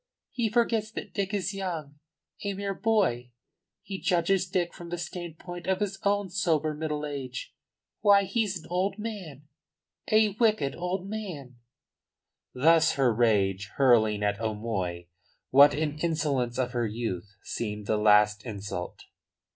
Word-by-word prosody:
He 235 -3 0
forgets 225 -1 +1
that 195 - -7
Dick 200 -1 -1
is 200 -1 -1
young 165 -7 -5 0.4
a 200 -1 -2
mere 200 0 -3
boy. 190 - +1 0.5
He 195 -2 -6
judges 180 0 +2
Dick 180 -2 0
from 170 -1 -10
the 175 - -3
standpoint 175 0 -7
of 190 0 +1
his 200 -2 -2
own 200 -2 +1
sober 160 -5 +1
middle 150 -1 -3
age. 135 -4 -6 0.5
Why, 200 -1 +5
he's 200 -4 -1
an - - -14
old 190 +3 0
man 195 - -6 0.7
a 215 0 +5
wicked 210 - +1
old 180 +2 -3
man!" 175 - -6 1.0
Thus 160 +4 +5
her 130 -4 +2
rage, 100 -4 +2
hurling 110 -6 +4
at 105 +1 0
O'Moy 105 -6 -3 0.5
what 140 +2 +7
in 150 0 -1
the 155 - -6
insolence 145 -7 0
of 125 -1 0
her 120 -2 0
youth 105 -3 -4
seemed 105 -2 -4
the 110 - +1
last 105 0 +4
insult. 100 -5 -6
155 Hz, 145 wpm, -28 LUFS, 120-195 Hz, 1.0 s, what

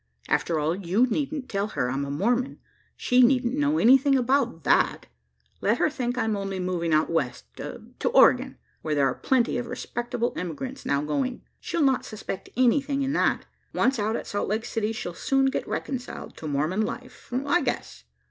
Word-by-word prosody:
After 150 +3 +1
all, 155 +3 0
you 195 +5 +2
needn't 275 +2 -2
tell 200 -2 -1
her 125 - +1
I'm 140 +2 -1
a - - -6
Mormon: 240 - 0 0.4
she 250 +1 +3
needn't 250 -1 +4
know 290 +2 +1
anything 270 +3 +5
about 250 - +1
that. - - +2 0.6
Let 215 +4 +2
her 310 - +2
think 245 -3 -2
I'm 220 -3 +1
only 195 -1 -3
moving 180 -2 -1
out 155 0 +3
west 130 - -1
to - - -5
Oregon - - +5 0.2
where 155 -1 -1
there 140 -1 +3
are 135 - +1
plenty 245 -2 +1
of 245 - -5
respectable 240 0 -3
emigrants 215 - -5
now 140 +1 +1
going. 245 - -2 0.2
She'll 340 -3 -1
not 265 -2 +3
suspect 215 -3 -6
anything 275 +2 +2
in 270 +1 -1
that. - - +1 0.3
Once 265 -2 +2
out 215 +2 0
at - - -4
Salt 205 - -2
Lake 220 +3 -1
City, 220 -1 -1
she'll 200 -6 -5
soon 270 +8 +1
get - - -3
reconciled 255 -3 -5
to 160 - -6
Mormon 155 +8 0
life, 245 +4 -6
I 280 +7 +1
guess." - - -3
235 Hz, 180 wpm, -26 LUFS, 180-265 Hz, 0.6 s, anything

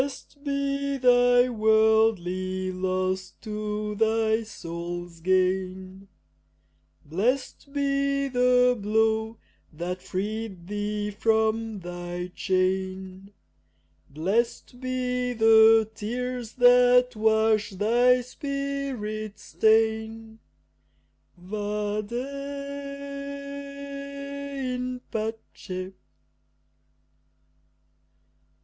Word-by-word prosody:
Blest 280 +1 -7
be 280 -1 -1
thy 245 -1 +5
worldly 215 -5 +2
loss 185 0 -2
to 210 -1 -3
thy 220 +1 +2
soul's 175 -4 -7
gain, 185 +1 0 1.0
Blest 245 - -1
be 275 0 +1
the 250 -1 +4
blow 220 +1 +1 0.3
that 175 +3 -4
freed 205 -1 -4
thee 210 +1 -3
from 220 0 +1
thy 175 0 -6
chain, 190 +1 -1 0.8
Blest 220 - -1
be 250 -1 -1
the 225 -1 +6
tears 245 +2 -4
that 250 0 +5
wash 220 0 +3
thy 240 +6 +3
spirit's 255 -6 -4
stain, 220 0 +1 1.0
Vade 210 +2 -3
in 280 -1 -5
pace! 215 -4 -5
220 Hz, 65 wpm, -26 LUFS, 195-250 Hz, 1.0 s, the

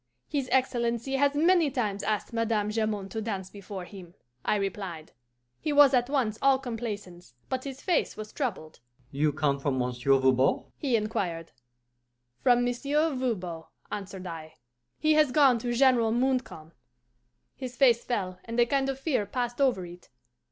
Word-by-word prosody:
'His 275 -3 -2
Excellency 245 0 +1
has 285 +1 +2
many 335 0 +4
times 215 -7 -2
asked 215 +2 -2
Madame 225 -2 0
Jamond 215 -3 -2
to 220 - -3
dance 195 -4 -4
before 195 -2 -8
him,' 180 -3 -12 0.3
I - - +1
replied. 190 -5 -4 0.5
He 305 - -2
was 285 -2 +7
at 245 0 +2
once 245 -7 0
all 275 -1 +5
complaisance, 205 - -6
but 260 0 -3
his 270 -1 -7
face 355 -4 0
was 215 0 -8
troubled. 190 - -4 0.3
'You 150 +1 +1
come 140 -1 0
from 135 -1 -1
Monsieur 125 +2 +2
Voban?' 130 0 +3
he 265 -5 0
inquired. 185 -7 -2 0.9
'From 245 -1 +4
Monsieur 285 +6 0
Voban,' 185 -11 -3 0.3
answered 195 -2 -6
I. 160 -2 -8 0.4
'He 310 0 +3
has 305 -3 +4
gone 265 -4 +5
to 240 +1 -3
General 240 -2 +4
Montcalm.' 245 -10 -1 0.8
His 255 -2 -7
face 240 -3 +4
fell, 185 -6 -3
and 230 +1 -3
a 240 - +6
kind 270 +2 0
of 270 - -2
fear 270 -8 0
passed 245 +3 -3
over 245 -10 +2
it. 175 +1 -13
230 Hz, 160 wpm, -28 LUFS, 185-260 Hz, 0.9 s, was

